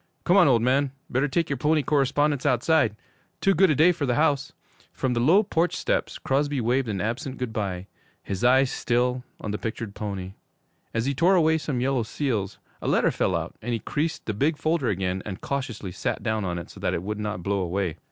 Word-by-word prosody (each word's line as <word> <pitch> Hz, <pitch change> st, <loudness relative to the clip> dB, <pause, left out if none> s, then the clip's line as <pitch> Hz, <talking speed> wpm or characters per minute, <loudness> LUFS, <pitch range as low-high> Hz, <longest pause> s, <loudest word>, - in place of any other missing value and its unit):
Come 180 Hz, -, +3 dB
on, 195 Hz, -6 st, +7 dB
old 120 Hz, -4 st, +4 dB
man. 135 Hz, +2 st, +2 dB, 0.2 s
Better 135 Hz, +4 st, +2 dB
take 165 Hz, +4 st, 0 dB
your 140 Hz, -, -2 dB
pony 150 Hz, +3 st, +2 dB
correspondence 145 Hz, 0 st, +1 dB
outside! 130 Hz, -2 st, +2 dB, 0.4 s
Too 195 Hz, -, +3 dB
good 190 Hz, +2 st, +4 dB
a 155 Hz, -, +3 dB
day 160 Hz, +6 st, +6 dB
for 160 Hz, -5 st, -2 dB
the 120 Hz, -, +1 dB
house.' 145 Hz, -2 st, +1 dB, 0.4 s
From 130 Hz, -2 st, -1 dB
the 120 Hz, -, 0 dB
low 170 Hz, -, +5 dB
porch 175 Hz, -3 st, 0 dB
steps -, -, -1 dB
Crosby 145 Hz, +1 st, 0 dB
waved 125 Hz, +2 st, +1 dB
an 100 Hz, -2 st, -2 dB
absent 130 Hz, -, -3 dB
good 125 Hz, -3 st, -4 dB
bye, 95 Hz, -4 st, -3 dB, 0.4 s
his 95 Hz, +1 st, -4 dB
eyes 130 Hz, +1 st, +4 dB
still 125 Hz, +1 st, 0 dB, 0.2 s
on 105 Hz, -, -4 dB
the 105 Hz, -, -3 dB
pictured 110 Hz, -2 st, -5 dB
pony. 95 Hz, -3 st, -5 dB, 0.6 s
As 115 Hz, +1 st, -1 dB
he 140 Hz, -, +1 dB
tore 175 Hz, +7 st, +4 dB
away 160 Hz, -2 st, +3 dB
some 135 Hz, -5 st, -2 dB
yellow 130 Hz, -1 st, +1 dB
seals, 110 Hz, -4 st, -2 dB, 0.2 s
a -, -, -4 dB
letter -, -, +3 dB
fell -, -, 0 dB
out, -, -, -3 dB
and 120 Hz, +2 st, -3 dB
he 115 Hz, -, -1 dB
creased 155 Hz, +9 st, -2 dB
the 110 Hz, -, -2 dB
big 145 Hz, +9 st, +1 dB
folder 155 Hz, -4 st, 0 dB
again 95 Hz, -2 st, -1 dB
and 95 Hz, -3 st, -6 dB
cautiously 130 Hz, -9 st, -4 dB
sat 90 Hz, -, -3 dB
down 110 Hz, -3 st, -1 dB
on 90 Hz, -1 st, -2 dB
it 85 Hz, -, -7 dB
so -, -, -13 dB
that -, -, 0 dB
it 85 Hz, -, -3 dB
would 105 Hz, +2 st, -4 dB
not 105 Hz, -4 st, -3 dB
blow 100 Hz, +1 st, 0 dB
away. 90 Hz, -2 st, -2 dB
125 Hz, 220 wpm, -25 LUFS, 105-145 Hz, 0.6 s, on